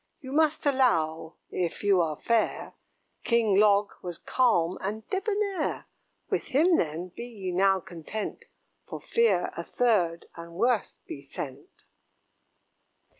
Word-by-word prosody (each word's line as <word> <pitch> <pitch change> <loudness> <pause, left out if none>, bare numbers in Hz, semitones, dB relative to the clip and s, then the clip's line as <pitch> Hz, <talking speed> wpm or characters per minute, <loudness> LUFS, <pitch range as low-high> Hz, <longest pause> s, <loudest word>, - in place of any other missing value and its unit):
You 260 -4 -9
must 310 +1 +2
allow, 165 - +1 0.2
if 175 +1 -3
you 200 -3 +4
are 155 -2 -1
fair, 230 -2 0 0.5
King 230 -4 +2
Log 205 -1 +4
was 175 -2 -5
calm 185 -9 +1
and 215 +3 -4
debonair: 400 -3 -1 0.4
With - - -1
him, 325 +6 +4
then, 165 +3 -2
be 235 +6 -8
ye 200 -6 -5
now 190 +1 +3
content, 185 - -6 0.4
For - - -6
fear 465 0 +1
a - - -4
third, 190 -9 +1
and 170 0 -10
worse, 230 +4 0
be 140 - -8
sent." 140 0 -9
205 Hz, 125 wpm, -27 LUFS, 170-255 Hz, 0.5 s, you